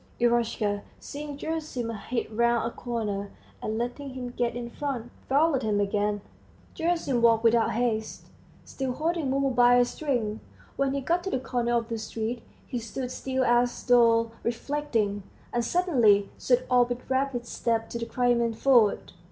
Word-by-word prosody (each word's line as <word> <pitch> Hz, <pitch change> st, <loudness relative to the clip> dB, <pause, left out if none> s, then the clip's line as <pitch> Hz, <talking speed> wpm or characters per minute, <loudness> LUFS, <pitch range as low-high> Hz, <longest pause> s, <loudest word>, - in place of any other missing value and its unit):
Eroshka, 235 Hz, -4 st, +1 dB, 0.2 s
seeing 290 Hz, 0 st, -7 dB
Gerasim, 300 Hz, -7 st, -3 dB, 0.2 s
hid 240 Hz, -2 st, -2 dB
round 235 Hz, 0 st, +2 dB
a 235 Hz, -, -3 dB
corner, 210 Hz, -5 st, -3 dB, 0.3 s
and 215 Hz, 0 st, -2 dB
letting 255 Hz, +3 st, -4 dB
him 250 Hz, -1 st, -5 dB
get 240 Hz, -1 st, -1 dB
in 240 Hz, -1 st, -4 dB
front, 245 Hz, -2 st, -4 dB, 0.2 s
followed 280 Hz, 0 st, +3 dB
him 215 Hz, -3 st, 0 dB
again. 205 Hz, 0 st, 0 dB, 0.5 s
Gerasim 330 Hz, -8 st, 0 dB
walked 230 Hz, -1 st, +4 dB
without 230 Hz, 0 st, +3 dB
haste, 225 Hz, -1 st, -1 dB, 0.4 s
still 265 Hz, -2 st, -3 dB
holding 320 Hz, 0 st, -1 dB
Mumu 275 Hz, 0 st, +1 dB
by 245 Hz, 0 st, +5 dB
a 245 Hz, 0 st, +5 dB
string. 240 Hz, -6 st, -2 dB, 0.4 s
When 275 Hz, 0 st, 0 dB
he 280 Hz, -, -1 dB
got 345 Hz, +6 st, 0 dB
to -, -, -1 dB
the 260 Hz, -, 0 dB
corner 240 Hz, -2 st, -1 dB
of 230 Hz, -1 st, 0 dB
the 230 Hz, -1 st, -3 dB
street, 225 Hz, +2 st, -4 dB, 0.2 s
he 245 Hz, -, -4 dB
stood 245 Hz, +3 st, -5 dB
still 260 Hz, 0 st, -1 dB
as 240 Hz, 0 st, +2 dB
though 230 Hz, -2 st, +4 dB
reflecting, 235 Hz, -4 st, -1 dB, 0.3 s
and 240 Hz, -, +1 dB
suddenly 235 Hz, -, +3 dB
set 250 Hz, 0 st, +1 dB
off 245 Hz, -1 st, +4 dB
with 245 Hz, 0 st, -5 dB
rapid 260 Hz, -2 st, 0 dB
steps 230 Hz, -1 st, -2 dB
to 235 Hz, -, -3 dB
the 230 Hz, -, -4 dB
Crimean 235 Hz, -2 st, +1 dB
Ford. 235 Hz, -5 st, +3 dB
240 Hz, 160 wpm, -27 LUFS, 230-265 Hz, 0.5 s, by